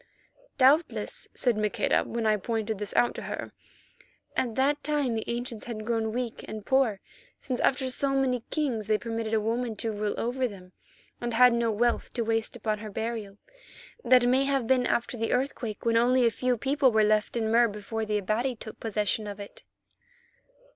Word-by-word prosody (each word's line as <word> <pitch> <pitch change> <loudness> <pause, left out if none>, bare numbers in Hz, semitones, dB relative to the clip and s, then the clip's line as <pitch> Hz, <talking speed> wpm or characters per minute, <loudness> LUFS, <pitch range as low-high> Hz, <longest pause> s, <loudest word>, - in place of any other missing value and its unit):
"Doubtless," 285 +5 +2
said 245 -3 +2
Maqueda, 210 +1 +1
when 230 -1 -3
I 215 -1 +4
pointed 220 0 -2
this 210 -1 -3
out 240 - +3
to - - -7
her, - - -6 0.8
"at 235 -4 -1
that 285 +2 +1
time 290 -5 0
the 220 - -2
ancients 235 -1 -4
had 215 -3 -6
grown 225 -1 0
weak 240 0 -4
and 215 -2 -7
poor, 265 -7 +2 0.4
since 255 -3 -3
after 260 0 +2
so 275 +2 +1
many 265 -3 +1
kings 255 -9 -1
they 215 0 +3
permitted 225 -1 -4
a - - +3
woman 230 +1 -1
to 225 +2 -3
rule 210 0 -2
over 250 +2 0
them 185 -4 -12 0.5
and 240 -1 -2
had 250 +1 +7
no 235 -1 +1
wealth 235 +2 0
to 235 - -1
waste 225 0 -1
upon 215 -2 -2
her 215 0 -7
burial. 220 -1 -4 0.7
That 250 -1 +5
may 260 +2 +3
have 275 -3 +1
been 255 +1 +3
after 240 +1 -1
the 225 0 -1
earthquake, 250 -5 -2
when 230 0 +3
only 250 +1 +4
a 230 - +4
few 250 +1 0
people 270 +2 +2
were 220 -1 +4
left 215 +2 +2
in 220 -1 0
Mur 235 +1 +5
before 210 +1 -4
the 210 -1 0
Abati 220 +6 -1
took 220 -1 -10
possession 210 -1 -1
of 205 0 -7
it." 200 - -9
230 Hz, 190 wpm, -28 LUFS, 215-250 Hz, 0.8 s, had